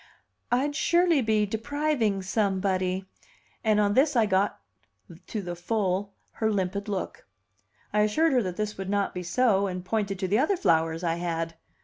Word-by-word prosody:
"I'd 280 +4 +1
surely 340 -1 +3
be 215 -2 +2
depriving 225 -2 -1
somebody!" 190 -2 0 0.6
and 215 -2 +3
on 205 -1 +2
this 275 +4 +3
I 230 -2 +4
got 195 0 +1 0.7
to 215 -3 -4
the 175 -1 -5
full 195 +1 -1 0.2
her 220 -1 -1
limpid 200 0 -2
look. 195 - -4 0.7
I 210 - +2
assured 275 +10 +2
her 250 - +4
that 185 -4 -4
this 210 -2 -3
would 190 0 -4
not 200 0 0
be 180 - -4
so, 200 +1 +2
and 180 -1 -5
pointed 200 0 -1
to 190 0 -2
the 205 +5 +2
other 360 +8 +2
flowers 165 - +1
I 165 -1 0
had. 165 -1 -2
205 Hz, 165 wpm, -27 LUFS, 185-225 Hz, 0.7 s, I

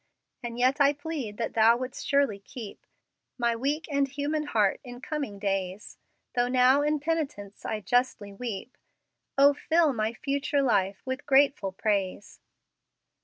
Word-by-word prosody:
"And 235 -1 -6
yet 255 +4 +2
I 280 0 +5
plead 285 -8 -5
that 230 - -3
Thou 225 +1 +5
would'st 255 +1 -6
surely 280 -8 +2
keep 210 +1 -10 0.5
My 235 -2 +1
weak 285 +7 -1
and 280 -1 +2
human 295 +3 -2
heart 210 -8 +1
in 245 -2 -9
coming 275 -7 -4
days; 195 0 -3 0.3
Though 245 -1 +2
now 255 +2 +4
in 300 +1 +1
penitence 285 -10 -3
I 215 -1 -2
justly 210 -1 0
weep, 235 +3 -6 0.6
O 280 +1 +7
fill 315 +1 +2
my 220 -1 -1
future 280 +3 -1
life 195 -6 +1
with 260 +2 -4
grateful 270 -8 +3
praise." 200 0 -2
250 Hz, 145 wpm, -27 LUFS, 210-280 Hz, 0.6 s, O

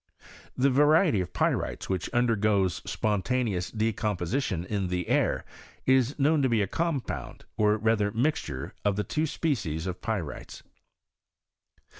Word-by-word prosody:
The 135 +2 +3
variety 150 - +4
of 90 - -5
pyrites - - -1
which 95 -3 -2
undergoes 105 -7 +2
Bpontaneoua 105 -2 -1
decomposition 105 -2 -1
in 100 -1 -2
the 90 -1 -2
air, - - +1 0.4
is 130 0 +3
knowB 150 +1 +3
to 130 - +2
be 115 -3 +2
a - - +1
compound, 135 - -3
or 105 0 +3
rather 110 -1 +2
mixture 110 - -2
of 105 -1 +2
the 105 - -1
two 155 +10 -1
species 100 - -2
of 90 -1 -4
pyrites. 100 -10 -4
110 Hz, 130 wpm, -28 LUFS, 95-130 Hz, 0.4 s, variety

